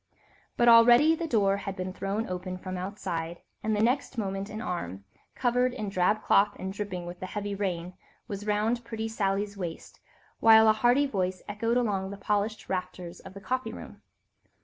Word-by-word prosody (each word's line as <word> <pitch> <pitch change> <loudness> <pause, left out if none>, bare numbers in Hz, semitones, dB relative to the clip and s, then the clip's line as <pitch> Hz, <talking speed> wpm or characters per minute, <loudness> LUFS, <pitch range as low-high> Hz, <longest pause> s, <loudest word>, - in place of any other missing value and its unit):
But 240 - +3
already 240 +6 +7
the 330 0 -3
door 200 -7 +2
had 195 -1 -5
been 185 -1 -4
thrown 200 +4 -2
open 185 0 -4
from 185 0 -6
outside, 175 -3 -4 0.2
and 215 0 0
the 210 - +1
next 255 +2 0
moment 195 -1 -3
an 215 +1 -6
arm, 100 - -4 0.3
covered 250 0 +1
in 210 - -3
drab 195 +3 +1
cloth 205 +1 +4
and 190 +1 -5
dripping 195 -4 -5
with 175 +1 -8
the 185 - -5
heavy 205 +1 -4
rain, 180 -3 -3 0.3
was 205 -1 -6
round 215 +3 +1
pretty 225 -1 -4
Sally's 205 -2 -1
waist, 175 -4 -7 0.4
while 220 0 +7
a 215 - +7
hearty 245 +6 +3
voice 185 -7 -2
echoed 230 +3 0
along 200 -6 0
the 200 - -7
polished 210 +1 -1
rafters 180 -2 -4
of 190 - -12
the 200 - -9
coffee 250 0 -2
room. - - -10
205 Hz, 180 wpm, -28 LUFS, 185-225 Hz, 0.4 s, already